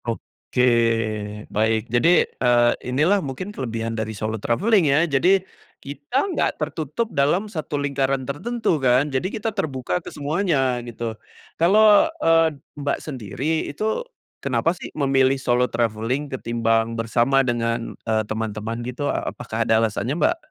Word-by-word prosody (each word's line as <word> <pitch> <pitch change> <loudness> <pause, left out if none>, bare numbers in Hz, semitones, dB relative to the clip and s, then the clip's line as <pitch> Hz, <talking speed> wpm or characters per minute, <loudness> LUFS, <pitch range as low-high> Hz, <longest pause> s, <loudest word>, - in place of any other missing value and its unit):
Oke, 120 +1 -3 0.9
baik 110 +1 +2
jadi, 120 +8 +4 0.3
eee, 120 -1 +4 0.2
ini 130 +3 0
lah 200 +3 +3
mungkin 170 +8 -5
kelebihan 115 - -3
dari 110 -1 -4
solo 110 +1 -3
traveling 180 - +2
ya, 150 +5 +4
jadi 180 +6 +3 0.4
kita 145 - -8 0.2
nggak - - 0
tertutup 155 - -2
dalam 145 +9 +2
satu 155 -3 -3
lingkaran 135 -2 -1
tertentu 170 - -1
kan, 130 +3 +3
jadi 135 +8 0
kita 220 +1 -3
terbuka 130 - -2
ke - - -8
semuanya, 145 -5 0
gitu. 115 -1 -4 0.5
Kalau, 210 - +6 0.2
eee, 165 -2 +4 0.2
Mbak 140 0 0
sendiri 140 - -3
itu 215 - -2 0.4
kenapa 165 - +1
sih 180 - -9
memilih 135 -2 +3
solo 125 -1 +1
travelling 115 +5 -1
ketimbang 115 -2 0
bersama 120 +4 +2
dengan, 115 -1 -1 0.2
eee, 110 0 +2
teman-teman 110 +1 -4
gitu? 125 +4 -4
A - - -2
apakah 115 -1 -5
ada 110 0 +3
alasannya, 115 +5 0
Mbak? 330 - +2
135 Hz, 140 wpm, -22 LUFS, 115-160 Hz, 0.9 s, Kalau